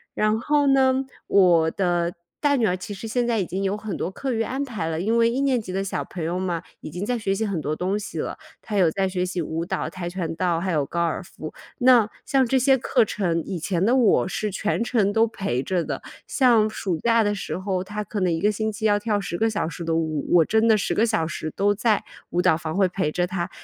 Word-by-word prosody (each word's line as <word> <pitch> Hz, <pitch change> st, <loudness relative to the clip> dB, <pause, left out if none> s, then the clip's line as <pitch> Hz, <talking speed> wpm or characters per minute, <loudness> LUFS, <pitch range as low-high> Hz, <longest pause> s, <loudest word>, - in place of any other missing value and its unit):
然 215 Hz, +1 st, +2 dB
后 290 Hz, +3 st, +2 dB
呢， 265 Hz, -1 st, +3 dB, 0.2 s
我 170 Hz, -5 st, +4 dB
的 175 Hz, -2 st, 0 dB, 0.3 s
大 290 Hz, -1 st, +3 dB
女 235 Hz, -5 st, +2 dB
儿 180 Hz, -, 0 dB
其 185 Hz, +3 st, -7 dB
实 200 Hz, +3 st, -7 dB
现 240 Hz, +2 st, 0 dB
在 235 Hz, -2 st, +1 dB
已 185 Hz, -, -1 dB
经 190 Hz, +2 st, -3 dB
有 195 Hz, +1 st, 0 dB
很 210 Hz, -2 st, -5 dB
多 175 Hz, -, -3 dB
课 265 Hz, +7 st, -4 dB
余 225 Hz, -2 st, 0 dB
安 265 Hz, +5 st, -2 dB
排 220 Hz, -12 st, -4 dB
了， 160 Hz, 0 st, -2 dB
因 225 Hz, +5 st, +1 dB
为 230 Hz, 0 st, +5 dB
1 245 Hz, +4 st, 0 dB
年 270 Hz, -3 st, +2 dB
级 200 Hz, -5 st, -7 dB
的 195 Hz, +1 st, -1 dB
小 195 Hz, -, -3 dB
朋 175 Hz, -, -6 dB
友 170 Hz, +3 st, -1 dB
嘛， 180 Hz, -3 st, -2 dB, 0.2 s
已 -, -, -8 dB
经 180 Hz, +5 st, -5 dB
在 245 Hz, +4 st, -1 dB
学 205 Hz, -4 st, -1 dB
习 205 Hz, +3 st, -1 dB
很 195 Hz, -5 st, -2 dB
多 150 Hz, 0 st, -2 dB
东 185 Hz, +5 st, -1 dB
西 210 Hz, -, -6 dB
了， -, -, -3 dB, 0.2 s
她 210 Hz, -2 st, -4 dB
有 175 Hz, -4 st, +4 dB
在 190 Hz, +2 st, 0 dB
学 180 Hz, -1 st, -1 dB
习 180 Hz, -1 st, -3 dB
舞 160 Hz, +1 st, -3 dB
蹈， -, -, -2 dB
跆 180 Hz, -2 st, -6 dB
拳 175 Hz, -2 st, -4 dB
道， 175 Hz, -1 st, 0 dB
还 185 Hz, +1 st, -1 dB
有 150 Hz, -4 st, +1 dB
高 170 Hz, +4 st, -2 dB
尔 170 Hz, +1 st, -1 dB
夫。 155 Hz, -3 st, -9 dB, 0.3 s
那 245 Hz, -4 st, +6 dB, 0.2 s
像 270 Hz, -2 st, +3 dB
这 260 Hz, +2 st, +2 dB
些 265 Hz, +1 st, +4 dB
课 250 Hz, -1 st, +2 dB
程， 180 Hz, -6 st, -1 dB
以 190 Hz, -, -4 dB
前 175 Hz, +2 st, -1 dB
的 235 Hz, +6 st, +3 dB
我 240 Hz, -7 st, +4 dB
是 210 Hz, +2 st, -2 dB
全 210 Hz, +4 st, -1 dB
程 220 Hz, -4 st, +1 dB
都 225 Hz, +2 st, +4 dB
陪 195 Hz, -, -2 dB
着 180 Hz, +1 st, 0 dB
的， -, -, -4 dB, 0.3 s
像 235 Hz, -5 st, +4 dB
暑 190 Hz, -4 st, -2 dB
假 230 Hz, -1 st, +3 dB
的 205 Hz, 0 st, +1 dB
时 200 Hz, -, -4 dB
候， 185 Hz, -1 st, -2 dB
她 210 Hz, +2 st, -5 dB
可 205 Hz, +1 st, -4 dB
能 185 Hz, -2 st, +1 dB
1 165 Hz, -, 0 dB
个 210 Hz, +4 st, +3 dB
星 220 Hz, +1 st, -2 dB
期 220 Hz, +1 st, -5 dB
要 205 Hz, -1 st, +3 dB
跳 210 Hz, -1 st, 0 dB
10 180 Hz, -3 st, -4 dB
个 225 Hz, -, +3 dB
小 210 Hz, -6 st, -1 dB
时 170 Hz, +1 st, -6 dB
的 165 Hz, 0 st, 0 dB
舞。 160 Hz, -2 st, -1 dB
我 165 Hz, -2 st, +6 dB
真 220 Hz, +5 st, +2 dB
的 220 Hz, -1 st, +5 dB
10 200 Hz, -, -1 dB
个 225 Hz, -, +2 dB
小 215 Hz, -7 st, +1 dB
时 155 Hz, -1 st, -4 dB
都 205 Hz, +1 st, +2 dB
在 215 Hz, +1 st, +1 dB, 0.3 s
舞 175 Hz, -, -1 dB
蹈 180 Hz, -3 st, +5 dB
房 160 Hz, +1 st, -4 dB
会 195 Hz, -2 st, +4 dB
陪 180 Hz, -4 st, -1 dB
着 175 Hz, +2 st, 0 dB
她。 180 Hz, -1 st, -3 dB
195 Hz, 270 characters per minute, -24 LUFS, 175-225 Hz, 0.3 s, 那